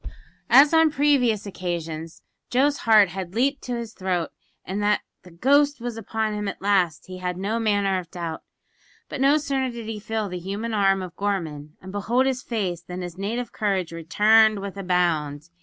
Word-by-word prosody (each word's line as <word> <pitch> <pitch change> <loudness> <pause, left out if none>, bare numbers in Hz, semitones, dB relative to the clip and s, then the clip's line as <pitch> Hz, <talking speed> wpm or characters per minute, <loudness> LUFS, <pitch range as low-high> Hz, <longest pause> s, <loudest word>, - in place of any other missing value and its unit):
As 285 +3 +7
on 320 -1 +6
previous 270 -8 +2
occasions, 165 -4 -5 0.3
Joe's 280 +3 +2
heart 210 -3 +7
had 185 +1 -6
leaped 275 +4 +1
to 245 - -2
his 235 -2 -6
throat, 180 -3 -2 0.3
and 195 +3 -3
that 210 0 +2 0.2
the 180 - -15
ghost 285 - +2
was 240 -1 -5
upon 220 -1 -2
him 210 -1 -3
"at - - -5
last" 185 -6 +1
he 185 0 -9
had 180 -1 -3
no 205 +5 -1
manner 205 -4 +1
of 175 -2 -10
doubt; 170 -3 -5 0.7
but 285 - -5
no 280 +2 +5
sooner 275 -3 -1
did 235 -2 -7
he 220 -1 -5
feel 220 0 -3
the 180 -1 -5
human 200 +6 -4
arm 195 -2 +2
of 180 -1 -9
Gorman 160 -7 -3
and 190 - -8
behold 230 +6 +1
his 260 -2 0
face 190 -9 -3
than 180 +1 -7
his 175 -2 -7
native 230 +4 -3
courage 195 -5 -1
returned 215 +6 +4
with 200 -1 -6
a 195 - -6
bound. 170 -4 0
200 Hz, 190 wpm, -24 LUFS, 180-230 Hz, 0.7 s, As